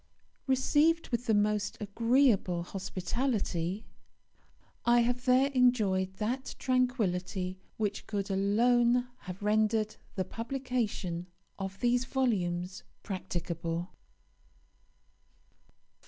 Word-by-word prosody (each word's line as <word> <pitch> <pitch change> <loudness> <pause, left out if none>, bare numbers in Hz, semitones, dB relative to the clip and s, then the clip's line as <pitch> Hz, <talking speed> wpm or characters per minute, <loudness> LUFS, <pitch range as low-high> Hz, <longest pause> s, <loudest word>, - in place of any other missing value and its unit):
Received 295 +5 +3
with 240 0 -2
the 220 - +4
most 210 0 +1
agreeable 220 -4 +2
hospitality, 195 0 -2 1.0
I 240 0 +5
have 245 +1 0
there 260 +2 +4
enjoyed 210 -8 +2
that 245 +6 -3
tranquillity 190 -8 0 0.2
which 205 -2 -2
could 200 -2 -2
alone 240 +5 +3 0.2
have 185 +3 -7
rendered 215 +1 +2 0.2
the 190 -2 -1
publication 230 -7 -3 0.3
of 195 0 -5
these 245 0 +2
volumes 185 -9 -1 0.2
practicable. 170 -2 -3
215 Hz, 85 wpm, -31 LUFS, 190-250 Hz, 1.0 s, I